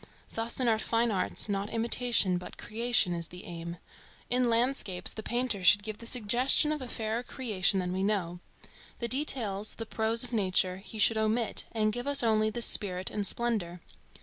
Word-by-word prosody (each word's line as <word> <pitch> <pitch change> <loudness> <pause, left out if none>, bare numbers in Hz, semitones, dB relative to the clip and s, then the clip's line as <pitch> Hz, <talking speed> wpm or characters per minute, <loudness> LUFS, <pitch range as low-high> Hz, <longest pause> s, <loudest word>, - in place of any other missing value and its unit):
Thus 230 +2 -2
in 255 - +1
our 220 -1 +2
fine 230 +1 0
arts, 190 +1 0
not 200 0 -2
imitation 230 -5 +2
but 180 - -11
creation 230 -4 +1
is 170 -1 -4
the 180 +1 -11
aim. 170 0 -7 0.5
In 250 -1 +2
landscapes 230 -6 +2
the 220 - -6
painter 240 -4 -2
should 205 +2 +5
give 215 0 -6
the 230 - -7
suggestion 250 +6 +2
of 305 -2 -3
a 255 - -6
fairer 225 0 -3
creation 210 -7 0
than 180 -1 -3
we 190 - -2
know. 190 -4 -1 0.6
The 235 - -2
details, 230 -7 -1
the 225 - -6
prose 225 +1 +2
of 250 -1 -8
nature 185 -3 +1
he 200 +3 -10
should 220 +1 +3
omit 220 +1 0
and 215 -1 0
give 245 +4 -5
us 285 -3 +4
only 215 -1 +2
the 235 +2 -3
spirit 185 -4 +1
and 205 -1 -2
splendor. 210 -8 -2
220 Hz, 185 wpm, -29 LUFS, 195-240 Hz, 0.6 s, should